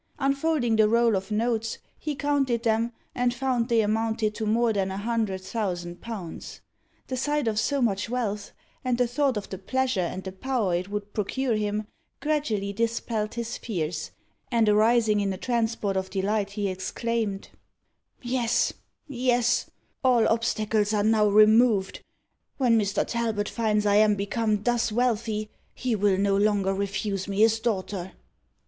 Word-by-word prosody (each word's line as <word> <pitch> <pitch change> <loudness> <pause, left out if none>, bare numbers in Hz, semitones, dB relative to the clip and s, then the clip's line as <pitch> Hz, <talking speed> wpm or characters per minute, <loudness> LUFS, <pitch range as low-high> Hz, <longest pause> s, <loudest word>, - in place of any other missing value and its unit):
Unfolding 275 -4 +1
the 215 -1 +5
roll 230 -1 +3
of 190 +1 -3
notes, 225 +1 -1 0.2
he 300 -1 -3
counted 275 -4 0
them, 225 0 +1 0.2
and 245 0 0
found 250 -2 0
they 230 -1 +4
amounted 220 0 0
to 215 0 -3
more 230 +1 +2
than 195 -2 0
a 190 - -4
hundred 215 -3 -1
thousand 180 -4 -4
pounds. 200 -8 -7 0.5
The 260 - -4
sight 290 +1 0
of 215 -1 +1
so 275 +4 +1
much 205 -1 0
wealth, 210 -5 -2 0.3
and 250 -2 0
the 250 - +3
thought 260 0 0
of 205 - -5
the 190 - -6
pleasure 260 0 0
and 185 +2 -3
the 190 - -5
power 215 -1 -1
it 180 +3 -1
would 205 0 -5
procure 240 +4 -1
him, 210 0 -1 0.3
gradually 230 -10 -1
dispelled 225 -1 -2
his 235 0 -4
fears, 165 -7 -3 0.4
and 230 -2 +3
arising 215 0 +4
in 200 -1 0
a - - -6
transport 225 -3 -1
of 190 0 -2
delight, 200 +1 -1
he 205 -1 -1
exclaimed 200 +2 -3 0.7
"Yes, 240 -1 +1 0.3
yes 245 -3 +1 0.3
all 245 -3 +4
obstacles 215 -2 +1
are 205 - +2
now 215 -1 +4
removed! 215 0 +4 0.5
When 245 -4 +3
Mr. 205 -2 +1
Talbot 225 -3 -1
finds 215 -2 0
I 205 0 +4
am 210 -1 +5
become 210 +1 -1
thus 240 -1 +1
wealthy, 220 -2 0 0.2
he 250 -3 -1
will 200 -2 +2
no 200 0 +2
longer 200 -1 +2
refuse 195 0 -2
me 200 +1 -1
his 225 0 +4
daughter. 195 -4 -3
220 Hz, 155 wpm, -26 LUFS, 200-240 Hz, 0.7 s, the